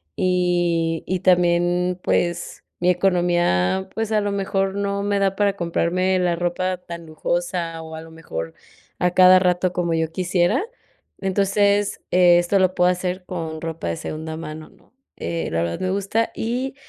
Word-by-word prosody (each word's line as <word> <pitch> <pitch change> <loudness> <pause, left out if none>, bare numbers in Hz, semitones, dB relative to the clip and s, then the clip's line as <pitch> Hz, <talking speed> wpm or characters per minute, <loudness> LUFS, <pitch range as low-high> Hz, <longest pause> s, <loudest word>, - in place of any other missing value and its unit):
y 175 -3 +1
y 185 0 -1
también, 175 0 +2
pues, 175 0 -1 0.2
mi 180 +1 +2
economía, 175 - +1
pues, 225 -1 -3
a 210 - +3
lo 205 0 -1
mejor 195 -1 -1
no 200 0 -1
me 205 0 0
da 195 -1 +1
para 200 -1 +1
comprarme 180 +2 0
la 175 -1 +1
ropa 180 +1 -1
tan 170 -2 -9
lujosa 165 +1 -3
o 160 0 -9
a 160 - -7
lo 165 - -13
mejor, 80 - -6 0.5
a 180 0 +2
cada 185 +1 +7
rato 180 0 +1
como 170 -2 -1
yo 160 -1 0
quisiera. 180 - +1 0.6
Entonces, 200 +1 +1
esto 175 +1 +4
lo 185 0 +2
puedo 180 0 +4
hacer 180 0 -2
con 160 -3 -5
ropa 165 - -5
de 85 - -3
segunda 160 +1 -6
mano, 155 -1 -8
¿no? - - -26 0.2
Eh, 165 -1 -3
la 85 +1 0
verdad 85 0 -3
me 185 0 0
gusta 200 +4 0
y, 250 +4 -3
180 Hz, 165 wpm, -22 LUFS, 170-190 Hz, 0.6 s, cada